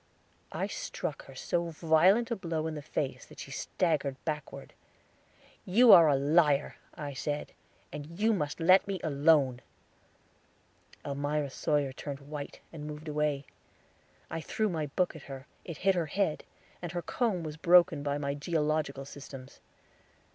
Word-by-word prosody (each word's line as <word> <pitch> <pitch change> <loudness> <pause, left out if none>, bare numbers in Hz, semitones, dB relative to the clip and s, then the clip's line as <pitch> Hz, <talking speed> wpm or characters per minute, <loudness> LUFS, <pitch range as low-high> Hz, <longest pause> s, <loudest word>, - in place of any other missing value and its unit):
I - - -2
struck - - -5
her - - -13
so 170 0 -1
violent 170 +9 +3
a - - +2
blow 165 -5 -3
in 160 - -2
the 150 - -5
face 145 -2 -3
that - - -15
she - - -8
staggered 150 -6 -1
backward. 150 -3 -5 0.9
"You 225 +5 +6
are 165 -2 +10
a 140 - +4
liar," 145 +1 +3 0.2
I 145 -1 -5
said, 145 +3 -3 0.4
"and 155 +5 -8
you 220 +2 +3
must 150 -6 -2
let 185 +4 +5
me 195 -2 -2
alone." 140 -4 +3 1.4
Elmira 145 0 -2
Sawyer 145 -1 0
turned 140 0 -6
white, 145 0 -7
and 150 -2 -7
moved 150 +1 -8
away. 150 -2 -1 0.9
I 165 - -3
threw 215 +6 -1
my 160 -4 -2
book 175 +5 0
at 160 - -9
her; 135 0 -8 0.2
it 165 -4 -6
hit 195 - +6
her 170 -3 -1
head, 175 -1 -1 0.4
and 175 -1 -5
her 175 -1 -3
comb 215 -9 -1
was 155 -1 -5
broken 170 -2 +5
by 145 0 -1
my 140 -1 -2
geological 150 -2 -1
systems. 135 -2 -11
155 Hz, 155 wpm, -30 LUFS, 145-175 Hz, 1.4 s, are